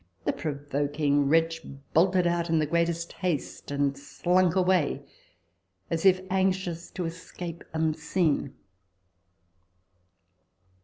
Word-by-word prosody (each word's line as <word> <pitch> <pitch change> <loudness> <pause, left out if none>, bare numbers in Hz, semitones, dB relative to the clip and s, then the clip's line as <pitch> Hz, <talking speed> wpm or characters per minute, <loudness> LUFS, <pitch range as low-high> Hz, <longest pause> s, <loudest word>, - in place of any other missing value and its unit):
the - - +1
provoking 145 -1 0
wretch 165 +1 +2 0.3
bolted 180 +2 +4
out 170 0 +1
in 165 - +3
the 155 - +2
greatest 170 +1 0
haste, 175 -6 -3
and 140 -1 0
slunk 175 +5 +1
away, 180 -7 +2 0.9
as 165 +3 +3
if 185 -1 +5
anxious 185 -3 0
to 180 - -4
escape 170 0 -7
unseen." 160 -2 0
165 Hz, 100 wpm, -27 LUFS, 150-180 Hz, 0.9 s, if